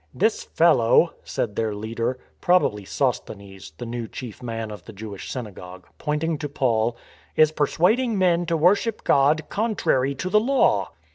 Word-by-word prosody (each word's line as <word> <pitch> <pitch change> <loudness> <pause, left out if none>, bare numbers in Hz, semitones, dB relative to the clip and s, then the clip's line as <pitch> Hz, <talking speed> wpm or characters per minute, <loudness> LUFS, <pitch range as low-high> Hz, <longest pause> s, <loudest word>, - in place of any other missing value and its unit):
" - - -40
This 220 - +1
fellow," 165 -1 +4
said 105 -4 -3
their 110 -2 -1
leader 115 +4 -3 0.2
(probably 175 - +2
Sos 130 +4 0
thenes, 95 -5 -12
the - - -6
new 120 0 -4
chief 120 0 -8
man 115 -2 -4
of 105 -4 -10
the 110 - -10
Jewish 100 -1 -8
synagogue) 95 -7 -8
pointing 150 +1 -1
to 145 - -4
Paul, 115 -4 0 0.2
" - - -30
is 155 -1 +5
persuading 205 - +1
men 175 -2 +2
to 165 -1 +1
worship 200 +7 +2
God 145 +3 +3
contrary 170 - 0
to 185 - -4
the 210 +3 +4
law." 265 +5 +2
135 Hz, 165 wpm, -23 LUFS, 110-170 Hz, 0.2 s, is